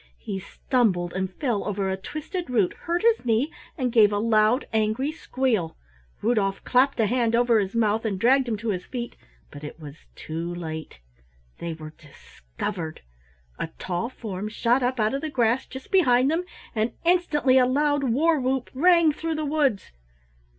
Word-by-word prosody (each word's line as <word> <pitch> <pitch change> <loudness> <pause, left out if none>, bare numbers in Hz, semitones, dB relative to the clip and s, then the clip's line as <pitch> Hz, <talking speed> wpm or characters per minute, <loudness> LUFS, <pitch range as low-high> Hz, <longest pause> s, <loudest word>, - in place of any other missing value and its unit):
He 195 - -5
stumbled 190 -4 0
and 190 0 -2
fell 235 -2 -1
over 200 -1 -2
a - - 0
twisted 305 - -6
root, 215 -7 +2
hurt 345 +2 -3
his 460 0 +3
knee, 245 +6 +1 0.2
and 255 -4 0
gave 215 -3 +6
a 205 - 0
loud 220 +3 +3
angry 220 +6 +1
squeal. 250 - -1 0.5
Rudolf 205 -4 +1
clapped 260 +1 +2
a 225 - +4
hand 235 +1 +1
over 235 -1 +4
his 195 +1 -2
mouth 220 -1 +2
and 205 -4 -2
dragged 260 +4 +4
him 225 -2 -1
to 225 +2 -4
his 185 -3 -2
feet, 240 -2 -6 0.4
but 145 +1 -11
it 150 +2 -8
was 150 0 -12
too 165 +2 -5
late 160 - -6 0.6
they 170 -1 -4
were 155 -1 -10
discovered. 155 - -7 0.6
A - - -2
tall 190 +6 -3
form 210 -5 -6
shot 235 +3 +1
up 250 0 0
out 215 +2 +2
of 275 - -2
the 315 - -3
grass 245 -2 +1
just 265 0 -10
behind 270 -8 +4
them, 340 +3 0 0.3
and 220 +1 0
instantly 300 -7 +3
a 250 - +4
loud 290 +2 +1
war 300 +6 +2
whoop 260 0 -1
rang 335 +3 +5
through 320 +2 -3
the 310 0 -2
woods. 280 -9 0
235 Hz, 175 wpm, -25 LUFS, 195-270 Hz, 0.6 s, gave